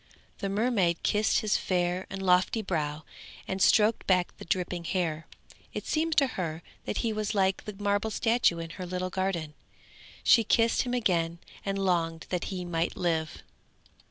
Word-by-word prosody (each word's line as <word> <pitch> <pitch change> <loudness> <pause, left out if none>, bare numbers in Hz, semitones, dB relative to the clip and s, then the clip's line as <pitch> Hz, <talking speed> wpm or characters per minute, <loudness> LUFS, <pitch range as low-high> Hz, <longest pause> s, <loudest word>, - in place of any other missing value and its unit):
The 200 - -2
mermaid 200 -5 +1
kissed 210 +1 +2
his 215 -1 +2
fair 180 0 -1
and 195 0 -5
lofty 185 +4 +3
brow, 155 -5 -2 0.4
and 190 0 -3
stroked 215 +2 +4
back 180 -2 +2
the - - -8
dripping 180 0 -1
hair; 165 -3 -2 0.5
it - - -4
seemed 320 0 0
to 285 - +6 0.2
her 165 -1 -4 0.2
that - - -3
he 225 - +1
was 215 0 -2
like 190 -1 +1
the 210 - -6
marble 205 +1 0
statue 225 -4 +2
in 165 0 -6
her 180 +1 -6
little 185 +1 -3
garden; 175 -5 -2 0.7
she 230 - +6
kissed 230 +2 +3
him 250 0 -2
again 170 -7 +1 0.3
and 195 0 -2
longed 170 -4 0
that 180 -1 -1
he 185 -3 -4
might 170 -1 -1
live. 160 -3 -1
185 Hz, 165 wpm, -28 LUFS, 170-210 Hz, 0.7 s, to